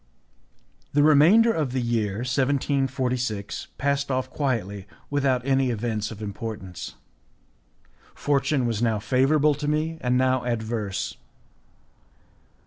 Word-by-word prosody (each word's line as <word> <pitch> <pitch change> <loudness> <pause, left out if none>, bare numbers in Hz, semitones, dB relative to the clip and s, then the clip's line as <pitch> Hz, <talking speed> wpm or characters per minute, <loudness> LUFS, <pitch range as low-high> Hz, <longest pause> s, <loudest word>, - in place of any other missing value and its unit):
The 145 +1 +4
remainder 170 +11 +6
of 150 - -1
the 130 - 0
year 115 -3 -1
1746 130 -4 -1
passed 140 0 0
off 130 -1 -1
quietly, 105 -8 -2 0.2
without 135 -3 +1
any 135 -1 +2
events 110 -2 -2
of 110 -1 -8
importance. 100 -3 -6 1.2
Fortune 140 -2 +1
was 115 -2 -1
now 115 -2 +2
favourable 135 +7 +3
to 145 +1 -4
me 155 +2 -1
and 125 0 +1
now 130 0 +2
adverse. 110 -4 -3
130 Hz, 110 wpm, -25 LUFS, 110-140 Hz, 1.2 s, remainder